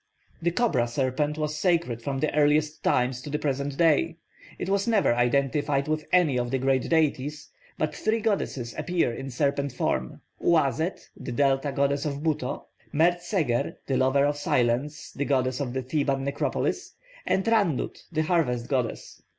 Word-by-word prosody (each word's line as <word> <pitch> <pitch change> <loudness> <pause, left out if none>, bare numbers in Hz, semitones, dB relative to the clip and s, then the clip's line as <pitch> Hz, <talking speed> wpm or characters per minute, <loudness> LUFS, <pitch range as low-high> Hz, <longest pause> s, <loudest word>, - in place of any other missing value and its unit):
The 170 - +2
cobra 175 - +1
serpent 135 +4 -1
was 150 -1 -2
sacred 165 -10 +1
from 135 +3 -3
the 155 - 0
earliest 150 +1 +2
times 125 0 +1
to 145 - -8
the 150 - -1
present 140 -1 -2
day. 165 0 +3 0.4
It - - -4
was 200 +1 +1
never 215 - +3
identified 140 +3 +1
with 155 0 -2
any 160 -8 +4
of 120 0 -2
the 135 - 0
great 130 0 +1
deities, 150 -2 0 0.3
but 155 - -1
three 220 +1 0
goddesses 185 - -1
appear 175 -9 0
in 135 +3 -6
serpent 140 +1 -1
form: 65 - -2 0.2
Uazet, 160 +1 +1
the 125 - -7
Delta 135 +2 +1
goddess 140 +1 +1
of 145 0 -3
Buto; 150 -5 -2 0.3
Mert 175 +4 +3
seger, 155 - -1
'the 135 - 0
lover 130 +2 +3
of 145 0 0
silence,' 130 +2 0
the 145 - -3
goddess 130 -2 +1
of 130 -4 -3
the 130 0 -2
Theban 135 0 0
necropolis; 140 +1 -2 0.3
and 190 - +1
Rannut, 205 - +1
the 155 -1 +1
harvest 135 -8 0
goddess. 125 -5 -2
145 Hz, 165 wpm, -26 LUFS, 130-155 Hz, 0.4 s, any